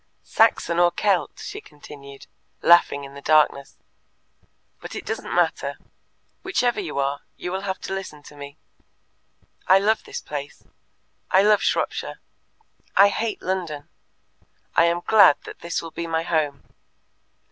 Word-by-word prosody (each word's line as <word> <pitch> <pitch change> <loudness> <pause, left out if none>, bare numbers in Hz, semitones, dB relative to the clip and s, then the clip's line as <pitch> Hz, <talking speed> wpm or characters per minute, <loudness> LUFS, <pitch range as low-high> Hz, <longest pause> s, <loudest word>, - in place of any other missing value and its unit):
"Saxon 170 0 +2
or 175 0 +5
Kelt?" 185 +1 0
she - - -7
continued, 140 -2 -13 0.4
laughing 170 -4 +5
in 140 0 -10
the 140 - -10
darkness. 150 -2 +2 1.0
"But - - -9
it - - -6
doesn't - - -4
matter. - - 0 0.7
Whichever 250 -9 0
you 375 - -5
are, 140 +1 -1 0.2
you 180 - -5
will 190 +1 -3
have 190 -2 -4
to - - -5
listen 180 -6 -7
to 145 - -14
me. 140 0 -10 1.1
I 190 - +7
love 215 +3 +1
this - - -6
place. 145 -1 -7 0.7
I 190 - +5
love 210 0 +4
Shropshire. - - -1 0.8
I 200 +1 +8
hate 220 +1 -3
London. 170 -6 -4 0.9
I 165 - +5
am 170 +1 +1
glad 200 -9 +7
that - - -10
this 170 0 -3
will 165 - -8
be 170 +1 -5
my 165 0 -1
home. 150 -4 -1
170 Hz, 145 wpm, -23 LUFS, 145-195 Hz, 1.1 s, I